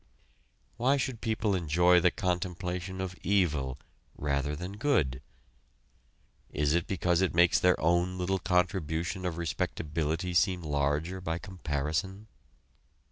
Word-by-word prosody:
Why 130 Hz, +4 st, +3 dB
should 130 Hz, -4 st, -3 dB
people 110 Hz, -2 st, 0 dB
enjoy 90 Hz, +1 st, +4 dB
the 90 Hz, -, +4 dB
contemplation 90 Hz, -1 st, -3 dB
of 95 Hz, -1 st, -4 dB
evil 75 Hz, -10 st, +1 dB, 0.4 s
rather 70 Hz, 0 st, -1 dB
than 90 Hz, +6 st, -6 dB
good? 90 Hz, -, +1 dB, 1.3 s
Is 75 Hz, 0 st, 0 dB
it 85 Hz, 0 st, +1 dB
because 90 Hz, -2 st, +1 dB
it 95 Hz, -3 st, +1 dB
makes 85 Hz, 0 st, +5 dB
their 90 Hz, 0 st, +3 dB
own 85 Hz, +2 st, +1 dB
little 95 Hz, +1 st, 0 dB
contribution 90 Hz, 0 st, 0 dB
of 85 Hz, -2 st, -4 dB
respectability 80 Hz, +1 st, -2 dB
seem 90 Hz, 0 st, +2 dB
larger 75 Hz, +5 st, -1 dB
by 80 Hz, -2 st, -2 dB
comparison? 90 Hz, +2 st, -3 dB
90 Hz, 120 wpm, -30 LUFS, 80-95 Hz, 1.3 s, makes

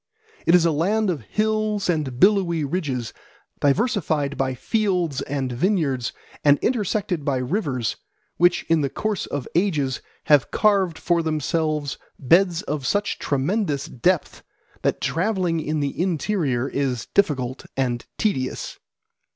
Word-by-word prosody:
It 170 Hz, -, +7 dB
is 175 Hz, -2 st, +5 dB
a 165 Hz, -, +4 dB
land 195 Hz, +7 st, +1 dB
of 155 Hz, -7 st, -4 dB
hills 215 Hz, -, 0 dB
and 150 Hz, -8 st, -1 dB
billowy 185 Hz, -4 st, +4 dB
ridges, 140 Hz, -7 st, -2 dB, 0.5 s
diversified 150 Hz, -, +1 dB
by 130 Hz, -1 st, -1 dB
fields 180 Hz, -, 0 dB
and 135 Hz, -2 st, -2 dB
vineyards 135 Hz, -, 0 dB, 0.3 s
and 145 Hz, -1 st, +6 dB
intersected 205 Hz, -, 0 dB
by 140 Hz, -2 st, 0 dB
rivers, 130 Hz, -, -1 dB, 0.4 s
which 175 Hz, +1 st, +3 dB
in 165 Hz, -2 st, +2 dB
the 140 Hz, -, 0 dB
course 215 Hz, +7 st, -2 dB
of 145 Hz, -3 st, -4 dB
ages 155 Hz, -8 st, +1 dB, 0.2 s
have 145 Hz, -4 st, +4 dB
carved 195 Hz, -6 st, +2 dB
for 170 Hz, -1 st, +1 dB
themselves 155 Hz, -2 st, -1 dB, 0.2 s
beds 175 Hz, +5 st, +3 dB
of 150 Hz, -7 st, -3 dB
such 205 Hz, 0 st, 0 dB
tremendous 145 Hz, +1 st, 0 dB
depth 175 Hz, +7 st, 0 dB, 0.4 s
that -, -, 0 dB
travelling 180 Hz, -2 st, 0 dB
in 155 Hz, 0 st, -1 dB
the 140 Hz, +3 st, -2 dB
interior 160 Hz, -, 0 dB
is 130 Hz, -4 st, -2 dB
difficult 130 Hz, -9 st, +1 dB
and 120 Hz, -3 st, -1 dB
tedious. 130 Hz, -12 st, -2 dB
160 Hz, 130 wpm, -23 LUFS, 135-190 Hz, 0.5 s, It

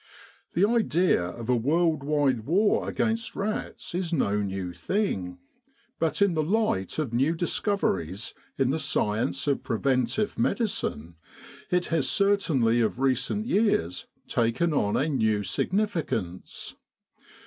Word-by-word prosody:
The 185 Hz, -, +4 dB
idea 185 Hz, -, +2 dB
of 110 Hz, +6 st, -6 dB
a 125 Hz, -, +3 dB
world 155 Hz, +5 st, +2 dB
wide 140 Hz, -6 st, +1 dB
war 200 Hz, +7 st, +2 dB
against 225 Hz, 0 st, -1 dB
rats 210 Hz, -3 st, -4 dB
is 175 Hz, -1 st, -2 dB
no 105 Hz, -10 st, +1 dB
new 95 Hz, -3 st, -3 dB
thing, 90 Hz, -, -2 dB, 0.6 s
but 165 Hz, +4 st, +2 dB
in 200 Hz, -3 st, +2 dB
the 160 Hz, -, +1 dB
light 165 Hz, -, 0 dB
of 145 Hz, -7 st, -2 dB
new 135 Hz, +7 st, +2 dB
discoveries 140 Hz, -, -1 dB, 0.2 s
in 135 Hz, -1 st, +2 dB
the 160 Hz, -, -1 dB
science 105 Hz, -, 0 dB
of 140 Hz, -2 st, +1 dB
preventive 130 Hz, -, 0 dB
medicine 140 Hz, -, -1 dB, 0.5 s
it 180 Hz, 0 st, +1 dB
has 160 Hz, -5 st, +2 dB
certainly 155 Hz, -, +2 dB
of 115 Hz, +2 st, 0 dB
recent 135 Hz, -, +1 dB
years 200 Hz, -, +1 dB, 0.2 s
taken 120 Hz, +8 st, +1 dB
on 105 Hz, -8 st, +1 dB
a 140 Hz, -, +1 dB
new 110 Hz, -8 st, +1 dB
signifi 185 Hz, -, -1 dB
cance. 90 Hz, -4 st, -5 dB
140 Hz, 130 wpm, -27 LUFS, -, 0.6 s, The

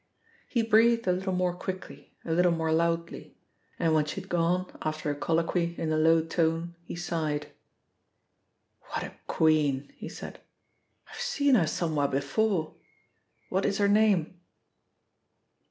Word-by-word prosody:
He 235 Hz, -3 st, 0 dB
breathed 230 Hz, +1 st, +4 dB
a 185 Hz, -, +3 dB
little 190 Hz, +1 st, -2 dB
more 180 Hz, -1 st, +1 dB
quickly, 185 Hz, +1 st, -7 dB
a 165 Hz, -, -3 dB
little 175 Hz, +2 st, +4 dB
more 160 Hz, -1 st, 0 dB
loudly, 170 Hz, +1 st, -1 dB, 0.4 s
and 165 Hz, -2 st, +1 dB
when 155 Hz, -1 st, +3 dB
she 150 Hz, -, -4 dB
had 195 Hz, 0 st, -12 dB
gone 175 Hz, +2 st, 0 dB
after 155 Hz, -1 st, -2 dB
a -, -, -3 dB
colloquy, 170 Hz, +3 st, 0 dB
in 160 Hz, -1 st, -2 dB
a 155 Hz, -, +1 dB
low 160 Hz, +1 st, +4 dB
tone, 165 Hz, +1 st, 0 dB
he 170 Hz, -, -8 dB
sighed. 155 Hz, -4 st, -2 dB, 1.4 s
"What -, -, -3 dB
a -, -, -7 dB
queen!" 150 Hz, -4 st, +2 dB
he -, -, -8 dB
said. -, -, -9 dB, 0.7 s
"I've -, -, -9 dB
seen 290 Hz, -, +2 dB
her 185 Hz, -10 st, +4 dB
somewhere 155 Hz, -3 st, 0 dB
before. 155 Hz, +6 st, 0 dB, 0.8 s
What 190 Hz, +1 st, 0 dB
is 200 Hz, -1 st, 0 dB
her 205 Hz, -, +3 dB
name?" 200 Hz, -5 st, +2 dB
170 Hz, 145 wpm, -28 LUFS, 160-190 Hz, 1.4 s, breathed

